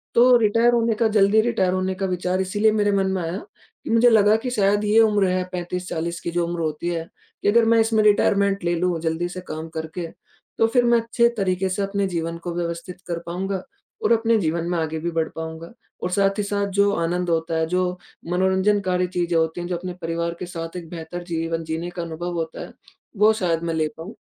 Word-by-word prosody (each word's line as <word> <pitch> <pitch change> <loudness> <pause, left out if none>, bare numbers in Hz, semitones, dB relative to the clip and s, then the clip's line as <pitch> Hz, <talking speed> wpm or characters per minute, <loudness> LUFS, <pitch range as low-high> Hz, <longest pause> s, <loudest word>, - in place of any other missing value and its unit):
तो 245 +1 +7
रिटायर 230 +2 +3
होने 230 -1 +2
का 230 - +5
ज़ल्दी 210 0 +4
रिटायर 215 -6 +1
होने 185 0 0
का 195 +1 -2
विचार 180 0 -1
इसीलिए 205 +3 +2
मेरे 205 -1 +2
मन 195 -1 +1
में 190 -2 -1
आया, 165 +3 -3 0.5
कि - - -7
मुझे 230 +2 +5
लगा 215 -1 +5
कि 250 - -1
शायद 205 -2 +2
ये 215 +2 +4
उम्र 210 -3 +3
है 185 0 0
35-40 175 -1 -4
की 170 - -4
जो 175 0 0
उम्र 175 0 -3
होती 155 +2 -2
है, 165 -1 -3 0.3
कि - - -1
अगर 230 +1 +4
मैं 230 0 +4
इसमें 220 -1 +3
रिटायरमेंट 200 -2 +3
ले 175 0 +1
लूँ, 175 -1 0
ज़ल्दी 165 +2 -1
से 185 +1 -7
काम 155 +1 -5
करके, 160 +2 -4 0.5
तो 225 - +4
फिर 245 +1 +2
मैं 235 -1 +4
अच्छे 235 +1 +2
तरीके 190 -1 0
से 195 +2 -2
अपने 200 0 -1
जीवन 170 -2 -3
को 175 -1 -4
व्यवस्थित 170 +1 -5
कर 170 -1 -2
पाऊँगा 190 +2 -3 0.4
और - - +2
अपने 225 0 +3
जीवन 170 -2 -1
में 175 - 0
आगे 160 -1 -2
भी 170 +2 -3
बढ़ 160 -1 0
पाऊँगा। 160 +1 -7 0.3
और 180 - 0
साथ 195 +1 +2
ही 210 - 0
साथ 200 0 -1
जो 200 0 +4
आनंद 175 +1 -1
होता 165 0 0
है, 160 - +1
जो 180 +1 -1 0.3
मनोरंजनकारी 190 0 +2
चीजें 175 -1 -1
होती 160 +2 0
हैं, 175 - -5
जो 180 - -2
अपने 180 +1 -5
परिवार 170 0 -2
के - - -4
साथ 165 -1 -7
एक 165 -2 -8
बेहतर 170 +1 -7
जीवन 165 0 -2
जीने 160 +2 -4
का 175 - -5
अनुभव 170 +1 -5
होता 165 -1 -4
है, - - -9 0.4
वो 210 +2 +6
शायद 170 -5 -1
मैं 165 -1 -1
ले 155 -1 +1
पाऊँ, 170 +7 -8
180 Hz, 220 wpm, -23 LUFS, 170-205 Hz, 0.5 s, तो